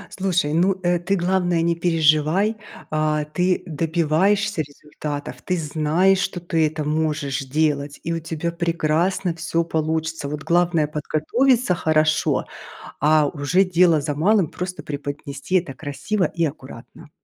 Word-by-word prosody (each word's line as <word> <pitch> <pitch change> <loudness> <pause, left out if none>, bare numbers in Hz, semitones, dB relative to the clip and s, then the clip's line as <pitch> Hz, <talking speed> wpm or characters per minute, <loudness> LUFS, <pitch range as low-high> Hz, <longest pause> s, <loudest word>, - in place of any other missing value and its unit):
Слушай, 180 -6 0
ну, 180 +4 +3
э, 175 0 +2
ты 180 +3 -1
главное 175 -2 +1
не 170 0 +1
переживай, 165 +4 +2 0.3
а, 155 -1 0
ты 180 +4 0
добиваешься 170 +4 +1
результатов, 145 0 -7
ты 185 - -1
знаешь, 160 +4 +2
что 190 -1 -2
ты 165 -2 +1
это 155 0 -2
можешь 150 -2 -1
делать 145 +1 -1
и 165 - -3
у 165 - -2
тебя 165 +1 -3
прекрасно 170 +1 0
всё 165 0 -1
получится. 160 -1 -2
Вот 150 +1 -5
главное 170 -3 +2
подготовиться 180 - +1
хорошо, 155 -1 +1 0.5
а 150 0 +4
уже 150 +6 +2
дело 175 -3 +4
за 145 +1 -2
малым, 185 +5 +3
просто 180 +4 -6
преподнести 145 +2 -5
это 170 -6 +1
красиво 160 +9 -2
и 170 -1 -1
аккуратно. 145 - -9
160 Hz, 135 wpm, -22 LUFS, 150-180 Hz, 0.5 s, а